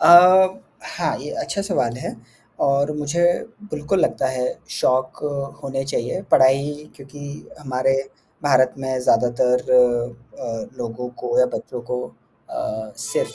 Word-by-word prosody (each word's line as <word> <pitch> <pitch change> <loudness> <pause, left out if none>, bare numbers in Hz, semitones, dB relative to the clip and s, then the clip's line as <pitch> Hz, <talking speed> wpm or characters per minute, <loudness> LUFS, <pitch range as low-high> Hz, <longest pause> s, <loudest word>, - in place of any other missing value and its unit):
अ, 185 +2 +8 0.2
हाँ - - -2
ये - - -7
अच्छा 200 - -2
सवाल 150 - 0
है 130 - -5 0.5
और 140 +2 +2
मुझे 150 +3 -1 0.5
बिल्कुल 155 +5 0
लगता 135 - +1
है 130 -1 -1 0.2
शौक 130 0 +1 0.5
होने 135 -1 -3
चाहिए, 135 +6 -2
पढ़ाई 140 +3 +3
क्योंकि 145 +1 -10
हमारे 135 -2 0 0.5
भारत 130 -2 +4
में 130 -1 -2
ज़्यादातर 125 0 +2 0.7
अ, 120 0 -6
लोगों 120 +1 -4
को 480 - 0
या - - +6
बच्चों 125 - -6
को 125 0 -1 0.5
अ, 110 0 -4
सिर्फ़ - - -2
135 Hz, 125 wpm, -22 LUFS, 125-150 Hz, 0.7 s, अ